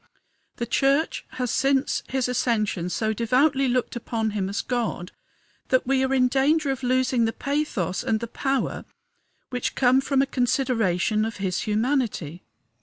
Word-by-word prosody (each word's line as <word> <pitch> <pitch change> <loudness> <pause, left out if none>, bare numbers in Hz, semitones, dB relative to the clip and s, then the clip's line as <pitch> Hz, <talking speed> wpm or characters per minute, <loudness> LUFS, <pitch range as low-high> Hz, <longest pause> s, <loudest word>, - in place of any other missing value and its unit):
The 235 - -3
church 275 +6 +1
has 250 -2 -2
since 275 0 +1
his 260 -1 0
ascension 215 -8 0
so 215 +6 -1
devoutly 265 +5 +2
looked 250 0 0
upon 225 -2 -2
him 195 -2 -2
as 200 - -2
God 235 -7 -2 0.6
that 255 - +2
we 265 +1 +2
are 265 - 0
in 255 -2 +4
danger 275 +3 +2
of 270 - -4
losing 255 -1 +2
the 225 - 0
pathos 275 - -2
and 220 - 0
the 235 - -4
power 270 +3 -2 0.7
which 250 -1 -2
come 255 0 +4
from 270 0 +2
a - - 0
consideration 225 -6 +1
of 225 +1 -3
his 190 -2 -1
humanity. 215 - -1
250 Hz, 155 wpm, -24 LUFS, 220-270 Hz, 0.7 s, in